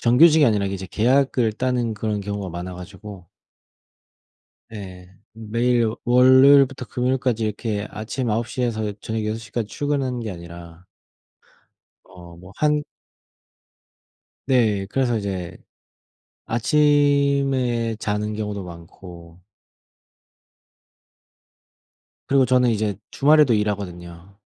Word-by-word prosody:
정규직이 150 Hz, +6 st, +5 dB
아니라 105 Hz, -5 st, +2 dB
이제 95 Hz, -1 st, -5 dB
계약을 125 Hz, -1 st, +2 dB
따는 125 Hz, -1 st, -1 dB
그런 105 Hz, -1 st, -3 dB
경우가 100 Hz, -1 st, -5 dB
많아 90 Hz, +2 st, -6 dB
가지고 95 Hz, 0 st, -11 dB, 1.4 s
네. 95 Hz, -4 st, -10 dB, 0.2 s
매일 115 Hz, +1 st, 0 dB
월요일부터 130 Hz, +1 st, +5 dB
금요일까지 125 Hz, -2 st, -1 dB
이렇게 105 Hz, -1 st, -3 dB
아침 115 Hz, +3 st, -4 dB
9 115 Hz, +2 st, -1 dB
시에서 110 Hz, -4 st, -2 dB
저녁 110 Hz, -1 st, -4 dB
6 110 Hz, +1 st, -2 dB
시까지 110 Hz, 0 st, -5 dB
출근하는 135 Hz, -4 st, -2 dB
게 110 Hz, -2 st, -5 dB
아니라 85 Hz, 0 st, -11 dB, 1.2 s
어 85 Hz, -1 st, -14 dB
뭐 90 Hz, +2 st, -14 dB
한 150 Hz, 0 st, +2 dB, 1.6 s
네 110 Hz, -7 st, +2 dB
그래서 120 Hz, +1 st, 0 dB
이제 95 Hz, -4 st, -5 dB, 0.9 s
아침에 140 Hz, -2 st, +1 dB
자는 105 Hz, +1 st, -2 dB
경우도 105 Hz, -2 st, -4 dB
많고 85 Hz, 0 st, -12 dB, 2.9 s
그리고 135 Hz, -1 st, +3 dB
저는 125 Hz, -1 st, +3 dB
이제 105 Hz, -2 st, -1 dB, 0.2 s
주말에도 150 Hz, -2 st, +4 dB
일하거든요. 95 Hz, -3 st, -4 dB
110 Hz, 230 characters per minute, -22 LUFS, 100-130 Hz, 2.9 s, 정규직이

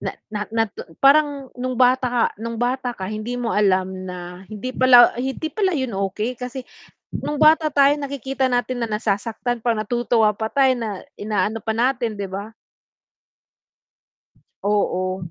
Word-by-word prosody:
Na -, -, -3 dB, 0.2 s
na 210 Hz, -, -3 dB
natun 225 Hz, -2 st, -2 dB, 0.2 s
parang 280 Hz, -1 st, +4 dB
no'ng 255 Hz, 0 st, -3 dB
bata 255 Hz, +1 st, +4 dB
ka 240 Hz, -1 st, +1 dB, 0.2 s
no'ng 230 Hz, 0 st, -4 dB
bata 250 Hz, +1 st, -1 dB
ka, 190 Hz, -, -5 dB
hindi 215 Hz, +3 st, -4 dB
mo 235 Hz, -2 st, -2 dB
alam 190 Hz, -2 st, +2 dB, 0.2 s
na 180 Hz, 0 st, -8 dB
hindi 215 Hz, +4 st, -6 dB
pala 255 Hz, -2 st, +7 dB
hindi 265 Hz, +5 st, -3 dB
pala 380 Hz, -5 st, +1 dB
'yon 260 Hz, -5 st, -2 dB, 0.2 s
okey 220 Hz, +6 st, -3 dB
kasi 250 Hz, +1 st, -6 dB, 0.5 s
no'ng 295 Hz, -, -3 dB
bata 310 Hz, 0 st, +6 dB
tayo 280 Hz, -1 st, +5 dB
nakikita 270 Hz, -1 st, -2 dB
natin 245 Hz, 0 st, -1 dB
na 230 Hz, -, 0 dB
nasasaktan 225 Hz, +3 st, -2 dB
pa, 235 Hz, 0 st, +1 dB
natutuwa 225 Hz, 0 st, +2 dB
pa 220 Hz, +2 st, -3 dB
tayo, 265 Hz, -2 st, +3 dB
na 225 Hz, -2 st, -3 dB, 0.3 s
inaano 210 Hz, +1 st, -1 dB
pa 220 Hz, -, -2 dB
natin, 240 Hz, -2 st, 0 dB
'di 200 Hz, -, -3 dB
ba? 205 Hz, +3 st, -6 dB, 2.1 s
Oo. 185 Hz, -3 st, -1 dB
240 Hz, 155 wpm, -22 LUFS, 210-260 Hz, 2.1 s, pala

